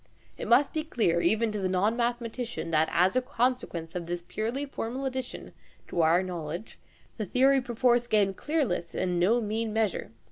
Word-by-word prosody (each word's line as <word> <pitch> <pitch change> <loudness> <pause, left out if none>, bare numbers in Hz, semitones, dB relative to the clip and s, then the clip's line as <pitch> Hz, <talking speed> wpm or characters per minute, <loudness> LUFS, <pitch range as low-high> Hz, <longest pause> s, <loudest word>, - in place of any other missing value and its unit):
It - - -6
must 255 +4 +4
be 310 -1 -1
clear 215 - +1
even 220 +3 +2
to 210 - -3
the 190 -1 0
non 195 +5 +2
mathematician 235 -5 -2
that, 160 0 +3
as 180 +4 +3
a 255 - +3
consequence 245 - -1
of 175 -2 -4
this 175 0 -3
purely 235 +6 -2
formal 265 -1 -4
addition 260 -1 -5 0.4
to 170 - 0
our 165 +3 +4
knowledge, 175 +2 -6 0.4
the 215 - -2
theory 270 +5 +4
perforce 240 0 +2
gained 200 -4 +2
clearness 240 - -1
in 180 -1 0
no 210 +7 +4
mean 220 0 -2
measure. 220 -3 0
220 Hz, 175 wpm, -28 LUFS, 180-250 Hz, 0.4 s, must